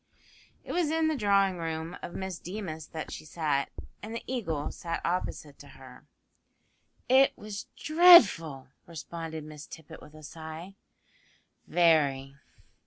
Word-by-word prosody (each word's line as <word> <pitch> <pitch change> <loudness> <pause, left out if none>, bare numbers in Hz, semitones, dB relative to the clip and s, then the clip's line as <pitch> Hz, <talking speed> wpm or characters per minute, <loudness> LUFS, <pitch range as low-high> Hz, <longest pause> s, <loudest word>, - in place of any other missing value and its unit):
It - - -7
was 345 -4 +1
in 320 0 +1
the 315 - 0
drawing 200 -5 +2
room 165 +1 -4
of 175 - -8
Miss 190 -2 -5
Deemas 175 -5 -6
that 160 -1 -7
she - - -7
sat, 150 -3 -1 0.3
and 220 +2 -7
the 230 - -5
Eagle 165 - -3
sat 165 -1 -4
opposite 165 -4 -3
to 145 - -13
her. 130 -1 -14 1.0
"It 265 +2 +5
was 210 -1 -7
very 310 +1 -6
dreadful," 165 - +7 0.2
responded 165 -1 -7
Miss 150 -1 -10
Tippet 160 -2 -12
with 150 - -15
a 155 - -13
sigh 160 +4 -9 0.9
"very." 140 -6 +2
165 Hz, 140 wpm, -29 LUFS, 155-205 Hz, 1.0 s, dreadful